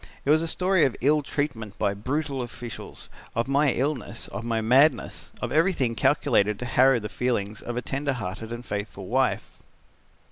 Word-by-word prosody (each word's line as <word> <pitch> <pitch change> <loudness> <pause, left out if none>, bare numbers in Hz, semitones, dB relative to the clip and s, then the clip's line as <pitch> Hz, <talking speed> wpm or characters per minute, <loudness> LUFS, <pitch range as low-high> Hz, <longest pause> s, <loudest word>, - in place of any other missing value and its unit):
It 140 - +3
was 155 +1 +5
a 165 - -1
story 185 +1 +2
of 130 - +2
ill 150 +4 +4
treatment 135 -8 -3
by 100 - +1
brutal 135 +6 -2
officials, 120 -2 -8 0.3
of 115 +2 0
my 140 +1 +3
illness, 125 -5 -2
of 115 - -6
my 115 -1 0
madness, 130 +8 +3
of - - -2
everything 155 -8 +2
calculated 110 -6 +2
to 125 - -5
harrow 130 +1 +4
the 105 - -5
feelings 110 -4 -2
of 120 0 -5
a 125 - -2
tender 140 +1 -1
hearted 110 0 -5
and 120 +1 -6
faithful 100 -2 -5
wife. 130 +6 +1
125 Hz, 175 wpm, -26 LUFS, 110-145 Hz, 0.3 s, was